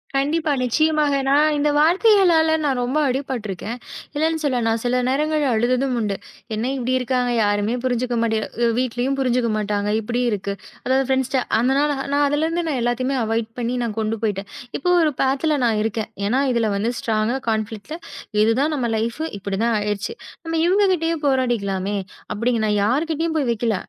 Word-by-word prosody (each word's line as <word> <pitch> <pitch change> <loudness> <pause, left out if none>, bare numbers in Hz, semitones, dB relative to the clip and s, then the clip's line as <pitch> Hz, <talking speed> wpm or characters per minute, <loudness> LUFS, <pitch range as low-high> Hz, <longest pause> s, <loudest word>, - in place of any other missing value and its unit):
கண்டிப்பா. 300 +3 +1
நிச்சயமாக. 305 +3 +2
நான் 295 +2 +4
இந்த 295 +1 +2
வார்த்தைகளால 345 0 +4
நான் 270 -3 +1
ரொம்ப 260 +5 -1
அடிபட்டு 255 -4 -2
இருக்கேன். 205 +6 -5 0.4
இல்லேன்னு 320 +2 +1
சொல்ல 255 -4 +1
நான் 225 0 +1
சில 250 +1 +1
நேரங்கள்ல 300 +2 +1
அழுததும் 250 +3 +1
உண்டு. 210 -3 -1 0.4
என்ன 220 +2 -2
இப்பிடி 255 -1 -1
இருக்காங்க. 250 -1 0
யாருமே 205 +2 +1
புரிஞ்சுக்க 245 -1 0
மாட்டே 225 -1 +1 0.3
அ - - +2
வீட்லயும் 255 +2 -1
புரிஞ்சுக்க 250 -2 +1
மாட்டாங்க. 205 -1 -1
இப்பிடி 240 +3 -2
இருக்கு. 200 -1 -2 0.3
அதாவது 265 +1 +2
ஃபிரண்ட்ஸ்ட்ட 265 0 +1 0.2
அந்தனா 265 +5 +2 0.3
நான் 290 0 +3
அதுல 290 +2 0
இருந்து 335 +1 -1
நான் 280 -5 -1
எல்லாத்தையுமே 255 +3 0
அவாயிட் 225 0 -1
பண்ணி 240 +1 -1
நான் 225 -2 -3
கொண்டு 220 +1 0
போயிட்டேன். 200 -2 -1 0.3
இப்போ 360 - -1
ஒரு 310 -2 +3
பாத்ல 280 +3 +1
நான் 220 -2 +2
இருக்கேன். 220 0 -2 0.2
ஏன்னா, 250 +6 +2
இதுல 230 -3 +1
வந்து 215 +4 0
ஸ்ட்ராங்க 220 +1 0 0.2
கான்ஃபிலிக்ட் 220 +5 -3 0.5
இது 220 +1 +4
தான் 305 +2 +1
நம்ம 255 -4 -1
லைஃப் 230 +6 -2 0.2
இப்பிடி 195 0 -3
தான் 235 -1 +2
ஆயிருச்சு. 205 - -2 0.3
நம்ம 325 0 -2
இவுங்க 390 +4 +3
கிட்டயே 330 -1 0
போராடிக்கலாமே! 205 -7 0 0.4
அப்பிடின்னு 230 +1 0
நான் 210 -1 +1
யார்கிட்டயும் 320 +7 0
போய் 275 -5 0
வெக்கல. 230 -1 0
250 Hz, 170 wpm, -21 LUFS, 220-290 Hz, 0.5 s, நான்